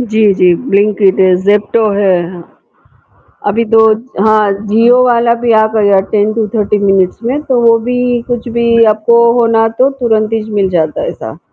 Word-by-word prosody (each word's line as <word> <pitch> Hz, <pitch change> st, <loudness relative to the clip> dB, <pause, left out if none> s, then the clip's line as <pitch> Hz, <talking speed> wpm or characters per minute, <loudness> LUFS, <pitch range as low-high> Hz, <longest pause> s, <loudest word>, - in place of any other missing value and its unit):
जी, 220 Hz, -3 st, +1 dB
जी। 180 Hz, -2 st, +2 dB, 0.2 s
Blinkit, 200 Hz, -1 st, +1 dB, 0.3 s
Zepto 210 Hz, +2 st, +1 dB
है, 195 Hz, -3 st, 0 dB
हाँ। 175 Hz, -2 st, -12 dB, 1.0 s
अभी 225 Hz, +3 st, 0 dB
दो 225 Hz, 0 st, +2 dB, 0.4 s
हाँ, 215 Hz, -2 st, +2 dB
जियो 230 Hz, +4 st, +3 dB
वाला 235 Hz, -1 st, +1 dB
भी 235 Hz, -, +1 dB
आ 220 Hz, 0 st, +3 dB
गया 200 Hz, -3 st, +2 dB
10 210 Hz, 0 st, 0 dB
टू 225 Hz, -2 st, -2 dB
30 210 Hz, -1 st, -1 dB
मिनट्स 195 Hz, +1 st, 0 dB
में 260 Hz, +5 st, -2 dB
तो 250 Hz, -2 st, +1 dB
वो 230 Hz, -1 st, +3 dB
भी 245 Hz, +2 st, -4 dB, 0.3 s
कुछ 240 Hz, 0 st, -4 dB
भी 235 Hz, 0 st, +2 dB
आपको 235 Hz, +2 st, +1 dB, 0.2 s
होना 225 Hz, -1 st, +1 dB
तो 265 Hz, +2 st, +2 dB
तुरंत 220 Hz, -2 st, -1 dB
ही 225 Hz, -1 st, -1 dB
मिल 200 Hz, -2 st, 0 dB
जाता 160 Hz, -3 st, -2 dB
है -, -, -3 dB
ऐसा। -, -, -9 dB
220 Hz, 170 wpm, -11 LUFS, 205-235 Hz, 1.0 s, जियो